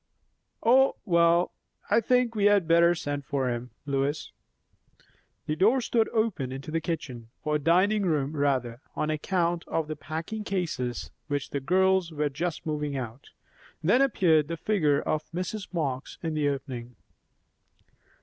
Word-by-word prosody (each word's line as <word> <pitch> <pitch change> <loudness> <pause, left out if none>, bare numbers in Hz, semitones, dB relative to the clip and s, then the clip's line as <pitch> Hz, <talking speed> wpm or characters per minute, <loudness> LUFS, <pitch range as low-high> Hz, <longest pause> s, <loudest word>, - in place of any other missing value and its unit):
"Oh! 260 +4 +5
Well. 170 -2 +4 0.4
I 230 - +5
think 250 +1 +2
we 205 -2 +1
had 205 -4 +4
better 170 +1 +5
send 145 -3 -3
for 135 -3 -1
him, 120 +1 -4 0.2
Lois." 140 +1 -1 1.1
The 155 - -1
door 220 +10 +4
stood 230 -2 +1
open 215 - -1
into 135 +4 -6
the 165 +1 0
kitchen, 130 -10 -5
or 150 -1 +1
dining 185 +8 +3
room 150 -2 0
rather, 130 -4 0
on 155 - 0
account 170 +2 0
of 160 -2 -1
the 155 - -4
packing 160 +9 -5
cases 155 - -3 0.2
which 145 -2 -3
the 140 - -1
girls 190 +3 +2
were 150 -1 -1
just 165 +4 -3
moving 150 -2 -2
out; 120 0 -7 0.5
then 205 +11 +4
appeared 170 - +3
the 165 0 -4
figure 155 -7 +2
of 155 0 -2
Mrs. 185 +3 -4
Marx 140 -7 -3
in 160 -1 -1
the 150 -2 +1
opening. 125 -3 -5
160 Hz, 150 wpm, -27 LUFS, 140-185 Hz, 1.1 s, Oh